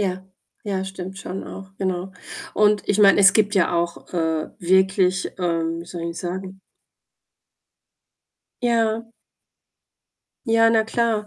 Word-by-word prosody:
Ja, 185 -1 -2 0.4
ja, 190 -2 -2
stimmt 190 0 -7
schon 190 0 -6
auch, 190 -1 -10
genau 185 0 -3 0.4
und 210 0 +2
ich 205 +1 +2
meine, 200 -1 +6
es 195 0 +7
gibt 210 -2 +2
ja 175 -1 +2
auch, 170 +1 -3
äh, 160 -2 -1
wirklich 190 +1 +2
ähm, 165 -2 -1
wie - - -9
soll 175 -1 -7
ich - - -3
'n - - -8
sagen 185 +2 -6 2.0
Ja. 230 -1 +1 1.4
Ja, 225 0 +4
na 220 -1 +3
klar. 225 -2 0
190 Hz, 135 wpm, -22 LUFS, 180-210 Hz, 2.0 s, es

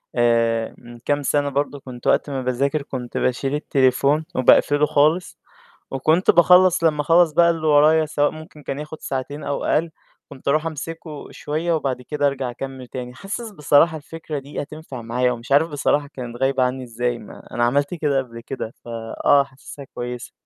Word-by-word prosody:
آآ 115 -1 +2
من 120 0 -13
كام 145 +4 -1
سَنة 145 +1 +1
برضه 140 +1 -2
كنت 125 -2 -9
وقت - - +2
ما 135 -2 -2
باذاكر 135 +4 0
كنت 125 -3 -6
باشيل 135 +3 0
التليفون 140 +1 +2
وباقفله 145 +3 +5
خالص، 155 +4 +2 0.5
وكنت 155 +7 +3
باخلّص 180 0 +5
لمّا 155 -2 +3
أخلّص 165 +2 +4
بقى 170 +2 +5
اللي 160 -2 -1
ورايا 155 +2 +5
سواء 145 -1 +1
ممكن 155 -1 -12
كان 140 +1 -4
ياخُد 150 +1 -8
ساعتين 140 +2 -4
أو 140 - -3
أقل، 165 +2 +1 0.4
كنت 130 - -12
أروح 155 +3 +2
أمسكه 160 -1 -6
شوية 160 +3 -2
وبعد 135 -5 -1
كده 145 +3 0
أرجع 135 -2 -2
أكمّل 130 +1 -7
تاني. 125 0 -7
حاسس 210 - -6
بصراحة 160 -1 +3
الفكرة 155 0 -6
دي 140 +2 -6
هتنفع 150 -3 -8
معايا 125 +2 0
ومش 120 +2 -7
عارف 145 +4 +5
بصراحة 145 -1 0
كانت 120 -2 -7
غايبة 135 -1 +2
عنّي 130 +1 -1
إزاي 120 0 -2
ما - - -13
أنا 120 - 0
عملت 140 +6 +1
كده 150 -5 0
قبل 120 -3 -7
كده 115 -2 -6
ف - - -16 0.4
آه، 145 -1 +6
حاسسها 140 +1 -12
كويسة. 125 -2 -7
140 Hz, 175 wpm, -22 LUFS, 125-155 Hz, 0.5 s, آه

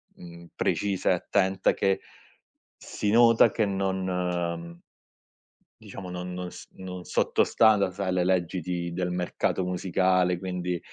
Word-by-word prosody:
uhm, 85 0 -12
precisa 100 -3 0
e - - +5
attenta 95 +1 +1
che 95 -1 +1 0.8
si 105 - -3
nota 115 0 +6
che 110 - +1
non 90 -3 -2 1.0
diciamo, 90 -2 -9
non 90 0 -5
non 90 -1 -5
s - - -11
non 90 -1 -8
sotto - - +1
sta 110 -1 +4
da 100 -2 +1
sai 95 0 -3
le 90 -1 +1
leggi 90 -1 0
di 85 0 -3
del 90 0 -2
mercato 90 +1 -1
musicale 90 0 +1
quindi, 90 -1 -3
90 Hz, 135 wpm, -27 LUFS, 90-95 Hz, 1.0 s, nota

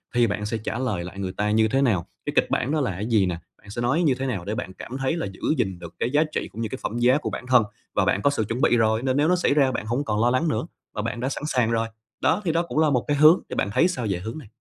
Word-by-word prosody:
thì 120 -1 +4
bạn 105 0 -2
sẽ 115 +1 -2
trả 110 +2 -4
lời 105 -9 -1
lại 90 +3 -8
người 95 -1 -3
ta 105 +1 +1
như 110 +1 +4
thế 135 +5 +1
nào? 105 -11 +2 0.2
Cái - - -2
kịch - - +3
bản 130 +4 0
đó 155 - +1
là 125 - 0
cái 95 +4 -4
gì 110 -5 +3
nè? 90 -2 -2 0.2
Bạn 100 - -17
sẽ 120 - -4
nói 140 +9 +2
như 140 -6 +3
thế 130 - -4
nào 105 -10 -3
để 105 - -2
bạn 95 -6 -5
cảm 130 +7 -7
thấy 135 +4 0
là 170 - -2
giữ 95 -1 -12 0.2
gìn 95 -7 -1
được 85 -1 -9
cái 120 - 0
giá 150 +2 +4
trị - - -2
cũng 115 - -6
như 110 - -2
cái - - -5
phẩm 115 - -3
giá 125 +3 +4
của 150 - -3
bản 125 - -6
thân? 125 -3 +5 0.3
Và - - +3
bạn 100 - +1
có - - +4
sự 140 -6 0
chuẩn 115 +5 -3
bị 120 - +4
rồi, 110 0 +2
nên 130 0 +1
nếu 145 +2 +3
nó 180 - +4
xảy 175 - +2
ra 140 -3 +3
bạn 110 - -3
hổng 120 +6 -1
còn 105 -3 0
lo 120 - +4
lắng 130 +7 +1
nữa, 155 - -1 0.3
và 105 - -1
bạn 115 +2 -3
đã 130 - -1
sẵn 140 - -5
sàng 120 -5 +1
rồi. 115 0 +1 0.3
Đó, 180 - +2
thì 165 - +2
đó 165 +1 +1
cũng 170 - -2
là 155 -1 +4
một 125 -4 +1
cái 145 - +1
hướng, 155 +5 +7
thì - - -4
bạn 100 - 0
thấy 175 - +4
sao 175 -10 -3
về 90 -2 -1
hướng 110 +9 -6
này? 135 -9 -10
120 Hz, 340 wpm, -24 LUFS, 105-140 Hz, 0.3 s, hướng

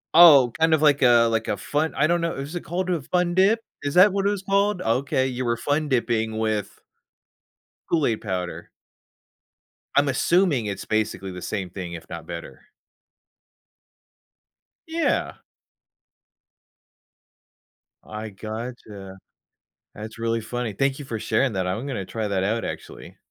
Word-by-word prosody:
Oh, 145 -8 +9
kind 160 0 +4
of 155 - -2
like 145 -2 +4
a 120 -2 +6
like 115 0 -1
a 100 - -1
fun 150 +10 -1
I 140 - +3
don't 170 +1 +2
know, 170 0 -1
is 140 +4 -6
it 175 - -3
called 185 +2 -3
a 170 -5 0
fun 175 +4 0
dip? 195 +5 +3 0.2
Is 145 +2 -3
that 190 +2 +7
what 200 0 +1
it - - +4
was 200 -2 -3
called? 200 0 +1
Okay, 130 +3 +1
you 125 0 -3
were 120 -1 0
fun 145 +4 -1
dipping 115 -3 0
with 110 -2 -2 1.1
Kool-Aid 140 -10 +1
powder. 90 -4 -4 1.3
I'm 145 0 +4
assuming 145 - +2
it's 100 -2 -4
basically 105 -3 -1
the 90 - -8
same 95 0 -4
thing, 90 -1 -7
if 85 - -9
not 85 -1 -7
better. 85 -5 -9 2.2
Yeah. 325 +1 0 2.7
I 110 0 -6
gotcha. 110 -2 -8 0.8
That's 110 +2 -9
really 115 0 -1
funny. 115 0 -4
Thank 135 +6 0
you 145 - -7
for 115 -4 -4
sharing 110 +2 0
that, 95 -1 -1
I'm 110 +9 -3
gonna 125 -9 -3
try 110 0 -4
that 95 -1 0
out, 115 +3 -1
actually. - - -8
120 Hz, 150 wpm, -24 LUFS, 105-160 Hz, 2.7 s, Oh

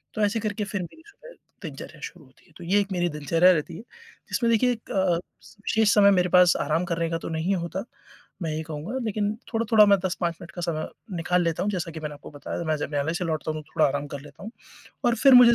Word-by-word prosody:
तो 215 - -1
ऐसे 205 +2 0
करके 210 0 -2
फिर 200 -2 -3
मेरी 315 - -9
सुबह - - -15 0.3
दिनचर्या 155 0 -8
शुरू 170 -5 -8
होती 130 - -25
है। - - -24
तो 175 - -10
ये 195 +4 +3
एक 200 - -5
मेरी 175 -1 +1
दिनचर्या 165 +4 +4
रहती 165 0 -3
है - - -8 0.5
जिसमें 235 -1 +1
देखिए 245 +2 +3
एक 230 -2 -6
अ, 190 -2 +2
विशेष 205 +4 -1
समय 200 -1 +7
मेरे 180 -1 +3
पास 180 -1 +6
आराम 160 +4 0
करने 170 -2 -1
का 165 - 0
तो - - -6
नहीं 165 +4 0
होता 175 +2 -3 0.6
मैं 160 - -2
ये 160 - -2
कहूँगा 160 - -5
लेकिन 210 -1 0 0.2
थोड़ा-थोड़ा 225 -1 +5
मैं 200 - +6
10-5 175 -2 -1
मिनट 170 - -10
का 175 - -7
समय 160 -2 -2 0.3
निकाल 175 +2 +1
लेता 165 +1 0
हूँ। 205 - 0
जैसा 175 -4 -3
कि 160 - -7
मैंने 150 -1 -4
आपको 145 - -12
बताया 145 +4 -5
मैं 155 -1 +1
जब 145 - -3
न्यायालय 145 +2 0
से 180 - -2
लौटता 155 -1 -2
हूँ 155 0 -5
तो 150 - -26
थोड़ा 155 - +5
आराम 145 +1 -2
कर 140 - -7
लेता 145 +5 -13
हूँ 220 - -7 0.5
और 240 -1 +4
फिर 265 +3 +6
मुझे 245 -1 +9
175 Hz, 245 wpm, -25 LUFS, 160-205 Hz, 0.6 s, मुझे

